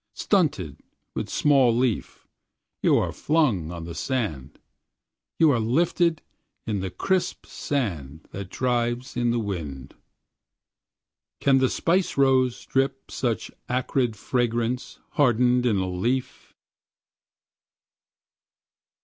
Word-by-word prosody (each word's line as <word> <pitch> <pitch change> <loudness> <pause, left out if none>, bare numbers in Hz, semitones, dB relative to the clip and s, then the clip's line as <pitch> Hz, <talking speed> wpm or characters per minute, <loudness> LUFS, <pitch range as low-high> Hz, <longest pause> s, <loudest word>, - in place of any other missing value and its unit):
Stunted, 140 - 0 0.3
with - - -4
small 135 -6 +3
leaf, 125 -4 -1 0.5
you - - +4
are - - 0
flung 120 - +1
on 85 -1 -6
the 85 0 -7
sand, 80 - -3 0.8
you 160 -2 +5
are 120 - +2
lifted 160 +7 +1 0.4
in 105 -3 -1
the 95 0 -3
crisp 190 - -1
sand 80 - -3
that 95 -1 -6
drives 120 +1 -1
in 120 -1 +1
the 120 - +1
wind. 80 - -5 1.5
Can 135 -1 +4
the 130 -1 +3
spice 180 0 0
rose 130 -2 +3
drip 135 0 -1
such 120 -4 -2 0.2
acrid 125 -2 0
fragrance 120 +2 -1
hardened 125 -2 +3
in 110 -4 +2
a 95 -1 0
leaf? 115 +9 -3
120 Hz, 105 wpm, -25 LUFS, 100-135 Hz, 1.5 s, you